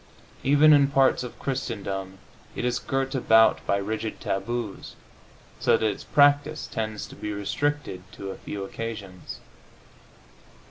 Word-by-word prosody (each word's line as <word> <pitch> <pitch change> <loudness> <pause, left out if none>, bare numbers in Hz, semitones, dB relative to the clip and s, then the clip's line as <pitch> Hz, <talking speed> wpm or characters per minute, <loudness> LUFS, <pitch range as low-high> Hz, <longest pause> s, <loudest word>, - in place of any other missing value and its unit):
Even 145 +3 +6
in 140 -1 +6
parts 135 -2 +3
of 125 -2 -7
Christendom 100 -7 -4 0.4
it - - -2
is 125 0 0
girt 135 0 -2
about 110 -4 +4
by 100 - +2
rigid 110 +2 -3
taboos, 110 +2 -4 0.6
so - - +4
that 110 - -1
its 105 - -1
practise 145 +1 +3
tends 110 -2 -4
to - - -12
be 105 - -5
restricted 105 +1 -2
to 100 0 -6
a - - -8
few 100 -1 -6
occasions. 100 -3 -7
115 Hz, 135 wpm, -26 LUFS, 100-135 Hz, 0.6 s, Even